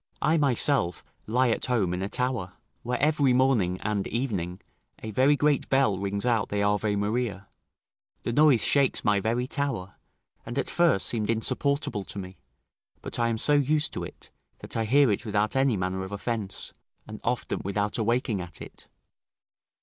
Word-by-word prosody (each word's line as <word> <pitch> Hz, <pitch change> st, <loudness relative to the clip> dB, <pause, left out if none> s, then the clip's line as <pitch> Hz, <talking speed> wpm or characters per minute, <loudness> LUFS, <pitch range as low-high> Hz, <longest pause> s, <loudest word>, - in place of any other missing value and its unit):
I 155 Hz, -, +2 dB
myself 135 Hz, -, +2 dB, 0.2 s
lie 125 Hz, +3 st, +2 dB
at -, -, -1 dB
home 110 Hz, -8 st, +1 dB
in 90 Hz, -, -3 dB
a 95 Hz, -, -2 dB
tower, 125 Hz, -8 st, -2 dB, 0.3 s
where 125 Hz, +1 st, -2 dB
every 145 Hz, -3 st, +3 dB
morning 120 Hz, -9 st, +2 dB
and 105 Hz, -2 st, -1 dB
evening 100 Hz, -8 st, -3 dB, 0.4 s
a 110 Hz, -, -4 dB
very 130 Hz, +7 st, +4 dB
great 145 Hz, 0 st, +1 dB
bell 135 Hz, -8 st, +2 dB
rings 100 Hz, +2 st, -2 dB
out 115 Hz, -4 st, +1 dB
the 100 Hz, 0 st, 0 dB
Ave 105 Hz, 0 st, +1 dB
Maria: 105 Hz, -1 st, -2 dB, 0.8 s
the 120 Hz, -, -2 dB
noise 145 Hz, -3 st, +5 dB
shakes 140 Hz, -2 st, +2 dB
my 105 Hz, -1 st, +3 dB
very 115 Hz, +5 st, 0 dB
tower, 135 Hz, -10 st, -3 dB, 0.5 s
and 120 Hz, +3 st, -6 dB
at 135 Hz, -, -1 dB
first 170 Hz, -, +3 dB
seemed 110 Hz, -3 st, -1 dB
insupportable 115 Hz, 0 st, 0 dB
to -, -, -7 dB
me; 95 Hz, -1 st, -8 dB, 0.6 s
but -, -, -3 dB
I 115 Hz, 0 st, +2 dB
am 115 Hz, -, -1 dB
so 150 Hz, -, +3 dB
used 150 Hz, +2 st, +2 dB
to -, -, -4 dB
it, -, -, -11 dB, 0.3 s
that -, -, -8 dB
I 115 Hz, -1 st, 0 dB
hear 135 Hz, +2 st, +4 dB
it 100 Hz, -, -1 dB
without 105 Hz, 0 st, 0 dB
any 135 Hz, -4 st, +2 dB
manner 95 Hz, +1 st, -2 dB
of 95 Hz, -, -7 dB
offence, 100 Hz, -1 st, -2 dB, 0.3 s
and 110 Hz, 0 st, -9 dB
often 125 Hz, +1 st, -2 dB
without 100 Hz, +3 st, -1 dB
awaking 115 Hz, -2 st, 0 dB
at 90 Hz, -1 st, -8 dB
it. -, -, -11 dB
115 Hz, 175 wpm, -27 LUFS, 100-130 Hz, 0.8 s, noise